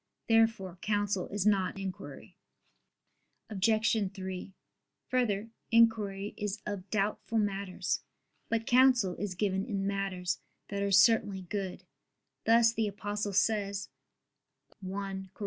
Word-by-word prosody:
Therefore 225 -6 +2
counsel 205 -3 0
is 205 -1 -2
not 195 -3 +2
inquiry. 195 -1 -7 1.2
Obj. 215 +3 +2 0.2
3: 190 0 -6 0.6
Further, 225 -4 0 0.2
inquiry 210 -3 +3
is 210 +1 -3
of 200 -2 -5
doubtful 215 +2 -1
matters. 200 -3 -1 0.5
But 225 -1 0
counsel 250 -6 +5
is 190 0 -3
given 190 0 0
in 200 -4 -2
matters 195 -3 -2 0.3
that 200 0 -3
are 200 - +1
certainly 200 -1 +4
good; 190 0 -4 0.6
thus 230 0 +5
the 225 -2 0
Apostle 205 0 -3
says 200 -1 +1 0.9
(1 190 0 -5
Cor. - - -25
200 Hz, 115 wpm, -31 LUFS, 195-220 Hz, 1.2 s, counsel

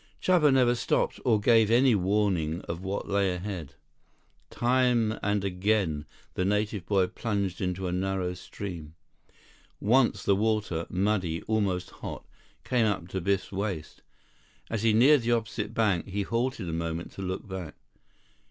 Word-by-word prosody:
Chuba 170 -6 +4
never 125 -2 +4
stopped, 120 - 0
or 115 -5 +3
gave 110 0 +4
any 125 +2 +5
warning 95 -5 +1
of 85 +1 -6
what 95 +1 -3
lay 100 -1 +1
ahead. 90 -7 -6 0.7
Time 120 -3 +2
and 105 -1 0
again 90 -5 0 0.3
the 90 - -1
native 105 -1 -1
boy 95 -3 +3
plunged 100 -3 -3
into 90 0 -2
a 90 - -1
narrow 95 0 -1
stream. 85 -4 -8 0.8
Once 120 +4 +3
the 100 - +3
water, 105 -5 0
muddy, 95 -4 0
almost 100 -5 -1
hot, - - -8 0.4
came 120 -3 +2
up 90 -4 -2
to 95 0 -3
Biff's 100 +2 0
waist. 95 -5 -4 0.7
As 110 -2 -1
he 115 0 +3
neared 130 +6 +6
the 120 +1 +1
opposite 110 -1 -2
bank, 105 -7 +1
he 100 +1 -2
halted 115 -2 -2
a 80 - -3
moment 85 +1 -3
to - - -9
look 95 +3 -4
back. 95 -5 -6
100 Hz, 150 wpm, -28 LUFS, 90-110 Hz, 0.8 s, neared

